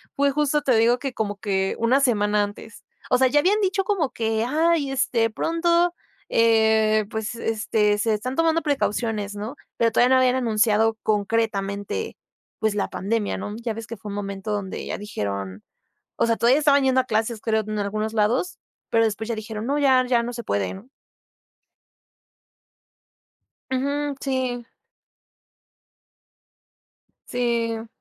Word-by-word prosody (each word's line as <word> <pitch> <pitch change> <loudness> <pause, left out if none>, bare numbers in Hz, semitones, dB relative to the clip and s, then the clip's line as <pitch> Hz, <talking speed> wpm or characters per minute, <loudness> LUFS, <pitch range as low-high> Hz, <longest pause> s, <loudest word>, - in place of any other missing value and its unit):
fue 280 0 +2
justo, 295 +1 +1
te 265 -4 +2
digo 235 +2 +3
que 270 0 -4
como 205 -3 -3
que 195 -2 -1
una 250 +4 +3
semana 210 -5 +2
antes. 205 +1 -8 0.3
O 250 - +4
sea, 260 +1 +4
ya 295 +4 +3
habían 385 +8 +3
dicho 390 0 +1
como 375 -9 0
que: 225 -1 -1
"Ay, 310 0 +1
este, 235 -4 +1
pronto, 340 +7 +1 0.4
eh, 220 -1 +3
pues, 220 +1 -4
este, 220 -2 0
se 220 +1 +1
están 250 +5 -3
tomando 330 +1 +2
precauciones", 225 -8 -1
¿no? 215 +7 -6 0.2
Pero 230 -1 +2
todavía 250 +3 +4
no - - +5
habían 255 0 +3
anunciado 220 -2 +2
concretamente, 205 -2 -1 0.4
pues 220 -1 0
la 205 - -1
pandemia, 210 +2 -2
no, 205 - -5
ya 230 -1 -2
ves 225 0 -8
que 230 - -7
fue 210 - -9
un 200 - -5
momento 200 0 -5
donde 200 -2 -4
ya - - -4
dijeron, 100 - -5 0.5
o - - +2
sea, 230 -1 +1
todavía 250 +5 +4
estaban 285 -2 +4
yendo 260 -1 +3
a - - -9
clases, 220 -1 -1
creo, 220 -1 +1
en 215 0 -3
algunos 215 +2 -2
lados, 230 +11 0 0.3
pero 225 0 +3
después 220 0 -1
ya 235 - -2
dijeron: 220 0 -6
"No, 280 +3 0
ya, 260 -3 +4
ya 240 -2 +2
no 240 - -4
se 235 0 -6
puede", 100 - -1
¿no? 205 +7 -12 2.8
Ujú, 280 +2 -1
sí. 255 -3 -2 2.6
Sí. 230 -2 -1
230 Hz, 155 wpm, -23 LUFS, 210-260 Hz, 2.8 s, no